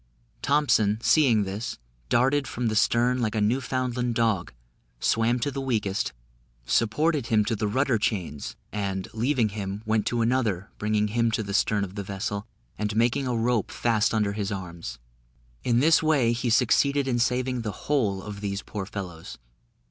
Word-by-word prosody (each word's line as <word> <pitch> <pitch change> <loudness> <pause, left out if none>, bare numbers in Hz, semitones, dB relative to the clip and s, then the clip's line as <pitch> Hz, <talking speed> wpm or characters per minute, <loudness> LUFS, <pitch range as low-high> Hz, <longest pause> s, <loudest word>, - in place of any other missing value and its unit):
Thompson, 125 -7 +3
seeing 125 -9 +4
this, 100 +5 -4 0.3
darted 135 +3 +2
from 120 -1 -2
the 110 - -2
stern 120 +3 +2
like 110 -1 -1
a - - +1
Newfoundland 125 +1 0
dog, 110 -6 +1 0.5
swam 115 - +2
to 145 - 0
the 135 0 -4
weakest, 110 - -1 0.5
supported 135 - +1
him 110 -2 +3
to 115 - 0
the 105 0 -1
rudder 130 +2 +1
chains, 90 -9 -2 0.2
and, 95 -2 -3
leaving 120 0 +1
him, 100 0 -5
went 110 -1 +1
to 120 -1 +1
another, 115 -6 0
bringing 105 0 +1
him 115 +1 +1
to 110 0 -1
the 100 -1 -5
stern 105 0 +2
of 95 -1 -5
the 100 - -4
vessel, 100 +1 -4 0.3
and 105 0 -1
making 120 +4 +2
a 125 - 0
rope 115 -2 +1
fast 110 -3 +1
under 105 -3 +1
his 100 -1 -3
arms. 85 -9 -6 0.7
In 120 0 +2
this 160 +2 +5
way 145 -7 +3
he 120 +1 -1
succeeded 140 +4 +3
in 120 -2 +1
saving 125 +1 0
the 110 -2 -3
whole 105 -10 +1
of 105 -1 -7
these 100 0 -3
poor 100 -3 -5
fellows. 90 -6 -7
110 Hz, 170 wpm, -26 LUFS, 105-125 Hz, 0.7 s, this